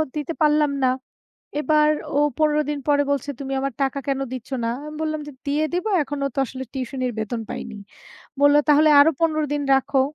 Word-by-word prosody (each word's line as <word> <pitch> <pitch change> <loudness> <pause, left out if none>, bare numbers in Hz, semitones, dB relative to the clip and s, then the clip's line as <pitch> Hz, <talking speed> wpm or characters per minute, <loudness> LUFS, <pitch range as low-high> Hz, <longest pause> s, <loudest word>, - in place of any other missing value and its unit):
দিতে 300 +2 -3
পারলাম 300 -1 +3
না। 255 - +4 0.7
এবার 300 +1 +3 0.3
ও - - +4 0.2
১৫ 300 -1 +3
দিন 295 - -2
পরে 285 0 +4
বলছে, 285 0 -1
"তুমি 270 0 -5
আমার 275 0 -2
টাকা 270 +1 0
কেন 275 -1 0
দিচ্ছ 255 -2 -7 0.2
না?" 230 - 0 0.2
আমি 300 0 -8
বললাম 310 -1 -2
যে, 295 - -8
"দিয়ে 295 +2 +1
দিব, 355 +4 -1 0.2
এখনও 280 0 -3
তো - - -6
আসলে 260 +2 -7
টিউশনির 255 -1 -3
বেতন 225 +2 -3
পাইনি।" 210 - -6 0.6
বলল, 285 0 +6
"তাহলে 300 +1 +6
আরো 305 +3 +6
১৫ 310 -2 +2
দিন 290 -1 -1
রাখো।" 270 0 +1
285 Hz, 190 wpm, -22 LUFS, 270-300 Hz, 0.7 s, বলল